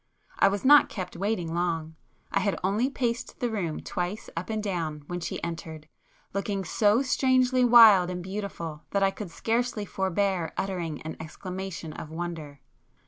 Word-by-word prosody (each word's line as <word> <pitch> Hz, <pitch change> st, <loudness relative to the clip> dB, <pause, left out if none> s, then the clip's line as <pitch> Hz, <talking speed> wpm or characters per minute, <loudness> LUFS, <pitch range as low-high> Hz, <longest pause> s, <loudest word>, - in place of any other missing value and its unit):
I -, -, +6 dB
was 200 Hz, +2 st, -1 dB
not 290 Hz, +2 st, +8 dB
kept 185 Hz, -4 st, -6 dB
waiting 180 Hz, -3 st, -2 dB
long; 165 Hz, -2 st, -1 dB, 0.4 s
I -, -, +2 dB
had 200 Hz, -, 0 dB
only 210 Hz, +7 st, +1 dB
paced 240 Hz, -4 st, -3 dB
the 240 Hz, -2 st, -1 dB
room 175 Hz, -8 st, -2 dB
twice 180 Hz, +4 st, -4 dB
up 165 Hz, +5 st, -4 dB
and 215 Hz, -1 st, -2 dB
down 165 Hz, -7 st, -3 dB
when 175 Hz, +3 st, -4 dB
she 170 Hz, -, -4 dB
entered, 160 Hz, -2 st, -6 dB, 0.5 s
looking 195 Hz, 0 st, -2 dB
so 210 Hz, +8 st, +3 dB
strangely 255 Hz, -1 st, +3 dB
wild 225 Hz, -7 st, +8 dB
and 180 Hz, -1 st, -4 dB
beautiful 185 Hz, -5 st, -5 dB
that 200 Hz, -1 st, +1 dB
I 195 Hz, -, +4 dB
could 200 Hz, -2 st, -7 dB
scarcely 225 Hz, +3 st, -1 dB
forbear 190 Hz, -3 st, -1 dB
uttering 175 Hz, -6 st, -3 dB
an 160 Hz, -, -6 dB
exclamation 180 Hz, 0 st, -6 dB
of 150 Hz, -, -8 dB
wonder. 160 Hz, -4 st, -6 dB
190 Hz, 160 wpm, -27 LUFS, 165-215 Hz, 0.5 s, not